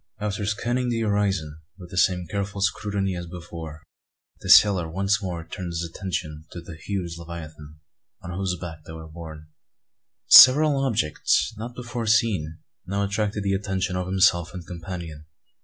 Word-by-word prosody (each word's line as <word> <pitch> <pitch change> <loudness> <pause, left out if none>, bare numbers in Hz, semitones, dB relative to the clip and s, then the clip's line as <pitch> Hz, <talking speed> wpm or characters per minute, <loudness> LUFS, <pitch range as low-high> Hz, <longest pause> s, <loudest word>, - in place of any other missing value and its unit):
After 105 -1 -3
scanning 120 +4 -1
the 115 -1 -1
horizon 100 -8 -1 0.2
with 90 -2 -12
the 90 - -7
same 90 -2 +2
careful 100 +3 -4
scrutiny 100 -1 -1
as 85 -1 -6
before, 85 -3 -9 0.6
the - - -7
sailor 95 -6 +6
once 95 +4 0
more 85 -4 -5
turned 95 -3 -6
his 85 0 -3
attention 80 -3 -5
to 85 - -6
the 85 0 -10
huge 85 0 -5
leviathan, 80 -3 -9 0.5
on 90 - -7
whose 90 0 -2
back 80 -3 -7
they 80 - -8
were 80 0 -9
borne. 80 -1 -10 0.8
Several 140 +1 +8
objects 80 - +1
not 115 +3 -7
before 120 -2 -5
seen 105 -8 +1 0.3
now 100 +2 -1
attracted 105 0 -2
the 100 -1 0
attention 95 -2 -2
of 90 0 -2
himself 95 -2 +2
and 90 -2 -7
companion. 85 -3 -8
90 Hz, 155 wpm, -24 LUFS, 85-100 Hz, 0.8 s, Several